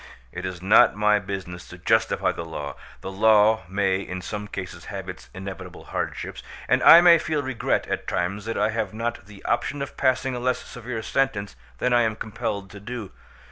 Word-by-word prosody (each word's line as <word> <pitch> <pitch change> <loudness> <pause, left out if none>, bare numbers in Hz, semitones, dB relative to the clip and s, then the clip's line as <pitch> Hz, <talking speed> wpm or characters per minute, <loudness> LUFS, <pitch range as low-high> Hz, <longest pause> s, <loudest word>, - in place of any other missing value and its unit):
"It 90 +1 -5
is 90 -1 -7
not 95 - +6
my 105 0 +3
business 95 -3 -6
to - - -11
justify - - +2
the 85 - -6
law: 75 -4 -6 0.3
the 95 - -6
law 110 +1 +4
may 95 -1 +1
in 90 -1 -5
some 105 +2 -5
cases 90 -4 -7
have 95 -2 -6
its 90 0 -9
inevitable 95 -1 -8
hardships, - - -4 0.3
and - - +3
I 170 - +10
may 170 -1 +7
feel 155 -2 -1
regret 130 -3 -1
at - - -4
times 95 +4 -2
that 115 - -3
I 105 +1 +2
have - - -3
not 115 -3 -3
the 100 -2 -14
option 140 +4 0
of 140 - -6
passing 130 0 +1
a 125 - -3
less 125 0 +1
severe 120 -2 -7
sentence 105 - -1 0.2
than 125 - +1
I 120 - +5
am 110 -2 +1
compelled 100 -3 -4
to 100 - -10
do. 110 -1 -7
105 Hz, 195 wpm, -24 LUFS, 95-120 Hz, 0.3 s, I